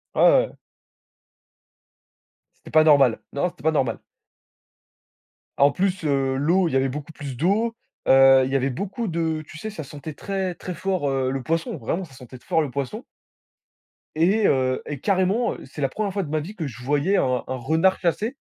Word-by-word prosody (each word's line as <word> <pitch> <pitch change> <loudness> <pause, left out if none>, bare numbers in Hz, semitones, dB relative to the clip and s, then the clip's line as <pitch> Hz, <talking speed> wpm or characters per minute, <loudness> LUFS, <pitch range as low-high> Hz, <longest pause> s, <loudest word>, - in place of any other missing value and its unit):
Ouais, - - +2 0.3
heu - - -18 2.0
C'était - - -15
pas 155 - +6
normal. 140 -6 +5
Non! 140 +6 0
C'était 175 -2 -18
pas 160 - +3
normal. 130 -7 0 1.6
En 140 +1 +5
plus, 185 +3 -1
heu, 135 -2 +1
l'eau, 170 +6 +2
il 160 - -4
y - - +1
avait 135 0 +1
beaucoup 145 +3 -6
plus 140 -4 -7
d'eau. 205 - +1 0.3
Heu, 135 0 +7
il 130 - -4
y - - 0
avait 135 0 +1
beaucoup 200 - -4
de 160 -2 -1
tu 160 - -11
sais, 215 +7 -5
ça 205 -7 -7
sentait 145 +2 -8
très 190 +2 -3
très 180 - -6
fort, 180 -3 -1
heu, 135 -1 0
le 135 -1 -3
poisson, 165 +5 -2
vraiment 165 +9 -3
ça 150 - -18
sentait 130 0 -12
t - - -24
fort 160 - +2
le 145 -4 -3
poisson. 140 - -4 1.1
Et 195 +7 +3
heu, 130 -1 +1
et 145 -2 -5
carrément, 195 - +1
c'est 150 - -9
la 135 - +1
1re 205 +7 -2
fois 200 0 -1
de 155 - -7
ma 155 +1 0
vie 180 +8 -7
que 160 -6 -4
je 125 -2 -10
voyais 145 +9 +1
un 125 -5 +1
un 130 - -3
renard 160 +9 +1
chasser. 215 - -1
155 Hz, 195 wpm, -23 LUFS, 135-185 Hz, 2.0 s, Heu